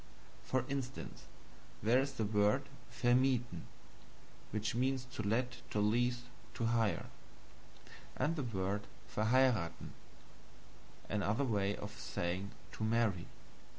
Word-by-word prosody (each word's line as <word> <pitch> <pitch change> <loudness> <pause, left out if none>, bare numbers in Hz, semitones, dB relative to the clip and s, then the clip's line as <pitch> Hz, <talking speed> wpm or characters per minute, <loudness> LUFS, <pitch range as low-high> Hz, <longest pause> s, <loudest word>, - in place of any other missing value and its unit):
For 130 -1 0
instance, 135 -2 -4 0.6
there 115 +4 +5
is 135 +1 0
the 115 - -1
word 105 +5 +3 0.3
VERMIETHEN 120 +1 +2 0.8
(to 125 +3 -1
let, 120 +4 0
to 105 - 0
lease, 120 +4 +2 0.3
to 115 - 0
hire); 115 -2 +2 1.1
and 165 +2 +2
the 155 - -1
word 100 -4 -1 0.2
VERHEIRATHEN 110 -5 +2 1.1
(another 105 +5 +1
way 100 -5 +1
of - - -7
saying 90 +3 -2 0.2
to - - -5
marry). 110 -5 +2
115 Hz, 100 wpm, -36 LUFS, 105-125 Hz, 1.1 s, there